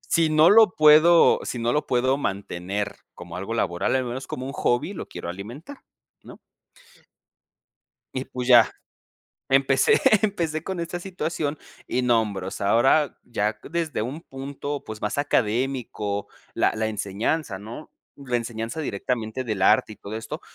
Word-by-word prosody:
si 165 -2 +1
no 155 +2 +6
lo 215 -3 +6
puedo 155 +3 +6
si 125 - -4
no 115 +1 0
lo 150 - 0
puedo 130 +2 +2
mantener 100 -4 -3 0.2
como 85 0 -9
algo 100 +5 -5
laboral, 85 -2 0
al 130 -1 +1
menos 125 +2 -5
como 130 +1 -5
un 135 - -5
hobby 120 +12 0
lo 170 - -6
quiero - - -8
alimentar, 120 - -8 0.4
¿no? - - -13 1.8
Y, 130 +1 -2
pues, 125 -1 -5
ya. 120 -2 +7 0.8
Empecé 135 0 +4 0.2
empecé 170 -7 -1
con 190 -2 -4
esta 170 +1 -4
situación, 160 -5 -3 0.3
y 125 - 0
nombros. 105 -6 0
Ahora 130 +8 +3
ya 105 -2 -2
desde 165 -4 -3
un 130 +9 -4
punto, 140 0 -6
pues, 110 -1 -8
más 105 +6 -2
académico, 120 -5 -1 0.3
la - - +2
la 110 0 -1
enseñanza, 105 +3 -2
¿no?, 115 +9 -10 0.3
la 130 -3 -2
enseñanza 115 +5 -4
directamente 120 0 -3
del 110 -5 -3
arte 105 +2 +4
y - - -12
todo 105 +2 -7
esto. 110 - -6
125 Hz, 150 wpm, -24 LUFS, 110-150 Hz, 1.8 s, ya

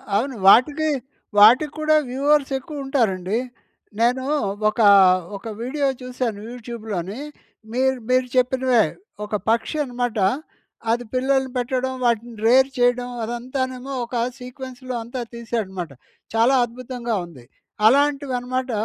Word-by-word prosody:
అవును 255 +5 0
వాటికి, 295 +9 +5 0.5
వాటికి 255 +8 +6
కూడా 310 0 +3
వ్యూవర్స్ 280 +2 +2
ఎక్కువ 280 +1 -7
ఉంటారండి. 215 -6 0 0.6
నేను 250 +3 +2 0.5
ఒకా 215 -1 +3 0.5
ఒక 200 - -10
వీడియో 280 +3 -1
చూసాను 250 -4 -3
యూట్యూబ్‍లోని. 220 -4 -6 0.5
మీరు, 265 +1 +1
మీరు 255 0 +3
చెప్పినవే 255 -2 +3 0.4
ఒక 210 - -3
పక్షి 230 +7 0
అనమాట. 245 -3 -3 0.7
అది 240 +1 0
పిల్లల్ని 265 0 +1
పెట్టడం. 260 +1 -1
వాటిని 235 0 0
రేర్ 260 +3 +5
చేయడం 245 0 +2
అదంతానేమో 255 +3 -4
ఒక 240 - -8 0.2
సీక్వెన్స్‌లో 255 0 -8
అంతా 245 +2 -6
తీసాడనమాట. 205 -8 -4 0.4
చాలా 230 +4 +4
అద్భుతంగా 240 -1 -5
ఉంది! 135 -8 -15 0.4
అలాంటివన్నమాట 260 -1 +2
250 Hz, 110 wpm, -22 LUFS, 230-265 Hz, 0.7 s, వాటికి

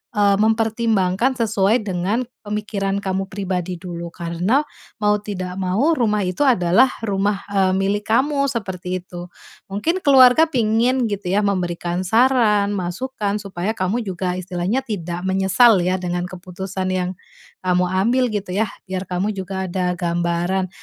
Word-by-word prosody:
eee, 200 -1 +4
mempertimbangkan 220 0 +1
sesuai 220 -1 +2
dengan 195 +5 -1 0.2
pemikiran 205 -1 -2
kamu 190 0 -2
pribadi 185 -2 -3
dulu. 170 -1 -7
Karena, 175 - 0 0.4
mau 210 0 +3
tidak 185 -3 -5
mau 210 - +1
rumah 210 -3 +1
itu 185 +8 0
adalah 230 0 +4
rumah, 200 -1 0
eee, 190 -2 +2
milik 200 +2 0
kamu, 275 +5 +2
seperti 185 -7 -4
itu. 175 0 -9 0.4
Mungkin 210 - -1
keluarga 265 +2 +7
pingin 240 -2 +1
gitu 205 -2 -4
ya, 205 - +3
memberikan 180 -2 -1
saran, 220 -2 +3
masukan, 205 +3 -3
supaya 195 +1 -3
kamu 215 +4 -1
juga 180 -1 -2
istilahnya 185 +8 -2
tidak 180 -5 -4
menyesal 190 +2 +4
ya 185 +1 +1
dengan 175 0 -3
keputusan 185 +1 -5
yang 180 -1 -1 0.6
kamu 180 0 +2
ambil 230 +8 +2
gitu 205 -3 -4
ya, 210 +2 0 0.2
biar 185 -1 -5
kamu 185 +4 -1
juga 190 -1 -4
ada 180 0 -1
gambaran. 175 +1 -1
195 Hz, 140 wpm, -20 LUFS, 180-220 Hz, 0.6 s, keluarga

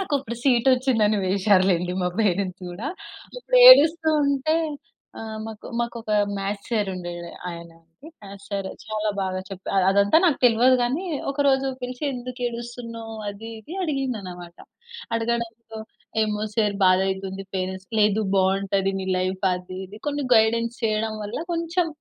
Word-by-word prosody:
నాకు 375 -6 -2
అక్కడ 235 -3 -6
సీటొచ్చింది 255 -2 +3
అని 210 0 +1
వేసారు 190 0 +3
లెండి 180 0 0
మా 180 - +1
పేరెంట్స్ 190 -2 0
కూడా. 200 +10 -5 0.5
ఇప్పుడు - - 0
ఏడుస్తూ 325 -7 +7 0.2
ఉంటే 280 +3 +1 0.6
ఆహ్, 220 -1 -6
మాకు 220 -1 -9
మాకొక 235 -2 -4 0.3
మ్యాథ్స్ 200 +1 -4
సార్ 210 -4 0
ఉండే 175 -1 -6 0.4
ఆయన 170 -1 -8
అండి. 165 - -17
మ్యాథ్స్ 200 0 -12
సార్ 200 -1 -2 0.2
చాలా 215 -1 -1
బాగా 185 -1 -2
చెప్పార్ 195 -1 -1
అదంతా 200 +5 +4
నాకు 325 -6 +3
తెల్వదు 245 +2 +5
గాని 260 +9 0 0.3
ఒక 285 +1 0
రోజు 270 0 +3 0.2
పిలిచి, 250 +2 -6
"ఎందుకు 250 0 -7
ఏడుస్తున్నావ్," 235 -1 -7
అది 205 +3 -7
ఇది 315 - -10
అడిగింది 270 -8 -2
అన్నమాట. 175 -2 -10 0.6
అడగడంతో, 230 -1 -3 0.4
"ఏమో 210 -1 -1
సార్ 210 -2 +1
బాధ 185 0 +5
అయితుంది 190 0 -4
పేరెంట్స్" 190 0 -4
"లేదు 210 +1 +3
బాగుంటది. 195 0 +1
నీ 190 - -5
లైఫ్" 185 +1 -2
అది, 180 +1 -7
ఇది 210 +3 -13
కొన్ని 290 -1 -2
గైడెన్స్ 230 +1 +2
చేయడం 220 0 0
వల్ల, 205 - -5
కొంచెం 335 +1 0
220 Hz, 150 wpm, -24 LUFS, 195-245 Hz, 0.6 s, ఏడుస్తూ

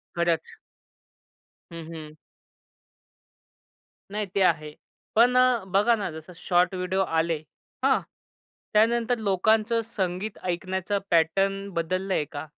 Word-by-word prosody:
खरंच. 170 -2 0 1.2
हं, 165 -1 -8
हं. 155 -1 -9 2.0
नाही 210 0 -2
ते 200 - +2
आहे. 150 -4 +1 0.4
पण 240 +3 +5
अ, 255 -4 +4
बघा 210 +4 +4
ना, 205 -4 -3
जसं 160 +3 -10
शॉर्ट 180 +1 +2
व्हिडिओ 185 +1 -1
आले. 165 -2 0 0.5
हां, - - +4 0.7
त्यानंतर 235 +3 +3
लोकांचं 220 +2 +2
संगीत 200 -2 -3
ऐकण्याचा 185 +2 -2
पॅटर्न 195 +4 +2
बदललंय 185 +1 -1
का? 145 0 -5
190 Hz, 105 wpm, -26 LUFS, 170-215 Hz, 2.0 s, पण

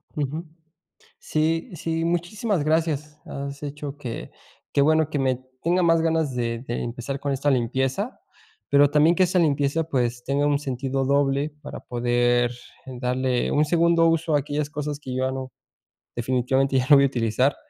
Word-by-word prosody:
Ujú. 150 +3 -3 0.7
Sí, 160 +2 0
sí, 165 0 -2
muchísimas 175 +2 -1
gracias. 150 -1 -1
Has 140 0 -6
hecho 145 0 -6
que 125 -5 -6 0.4
que 140 - +2
bueno 155 +1 +3
que 150 - -2
me 130 -2 +1 0.2
tenga 180 +2 +2
más 165 -1 +4
ganas 160 -4 0
de 115 -1 -2
de 120 - -2
empezar 125 +3 -4
con 140 0 -2
esta 140 +2 +1
limpieza, 130 - -1 0.5
pero 140 0 +5
también 150 +4 +4
que 185 - +4
esa 180 +1 +1
limpieza, 145 0 +1
pues, 125 -6 -1
tenga 140 +2 +1
un 145 -1 +2
sentido 135 -1 -2
doble 140 +2 +1
para - - -8
poder 120 0 +1 0.4
darle 125 0 -1
un 150 +1 +3
segundo 170 +1 +3
uso 165 -1 +1
a - - +4
aquellas 145 +1 -3
cosas 150 -1 -4
que 130 -3 -7
yo 130 0 0
ya 130 - -1
no, 130 -1 -5 0.6
definitivamente 130 +2 +1
ya 130 0 0
no 145 - +9
voy 140 - +6
a - - +4
utilizar 125 +1 +1
140 Hz, 170 wpm, -24 LUFS, 130-155 Hz, 0.7 s, no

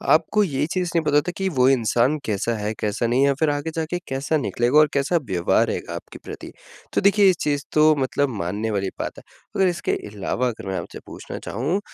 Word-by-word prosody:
आपको 190 +6 +2
ये 145 -5 0
चीज़ 180 -2 -1
नहीं 165 - +3
पता 145 -1 +2
होता 150 +4 +2
कि 195 - -1
वो 125 - +6
इंसान 125 +2 +2
कैसा 110 +2 -1
है, 105 +1 -2
कैसा 105 +2 -1
नहीं 125 +3 +2
है - - +5
या 140 - +3
फिर 160 - +3
आगे 145 +2 -2
जाके 165 +2 -2
कैसा 140 +4 -1
निकलेगा 125 0 +1
और 155 - +6
कैसा 140 +5 +2
व्यवहार 90 -2 +2
रहेगा - - -4
आपके - - -9
प्रति? - - -8 0.4
तो - - +2
देखिए 200 0 +5
इस 180 - +2
चीज़ 145 -1 0
तो 155 0 +5
मतलब 140 +1 0
मानने 105 +5 -2
वाली 100 -2 -1
बात - - -4
है। - - -12 0.4
और 190 - +5
इसके 175 -1 -1 0.2
अलावा 105 +5 -1
अगर 115 -4 -5
मैं 95 -1 -2
आपसे 85 - -8
पूछना - - -8
चाहूँ 140 - -2
140 Hz, 220 wpm, -23 LUFS, 115-160 Hz, 0.4 s, वो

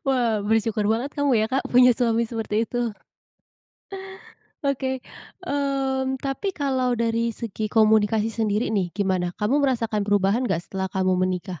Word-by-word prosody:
Wah 235 -6 +1
bersyukur 220 0 +1
banget 235 +6 0
kamu 285 -1 +1
ya 215 - +2
Kak 265 +4 -1
punya 250 0 +7
suami 230 -1 +1
seperti 225 -1 -2
itu? 240 -1 -2 1.7
Oke. 265 -2 -1 0.4
Mmm, 270 -3 -1
tapi 275 +9 -3
kalau 260 -4 0
dari 230 0 0
segi 215 -1 -4
komunikasi 220 0 +3
sendiri 220 0 0
nih, 195 -4 0
gimana? 190 -3 0
Kamu 245 +8 +1
merasakan 230 -6 0
perubahan 205 +4 +1
enggak 170 +1 -1
setelah 190 -1 -4
kamu 185 0 0 0.2
menikah? 180 -2 -4
225 Hz, 140 wpm, -24 LUFS, 210-260 Hz, 1.7 s, punya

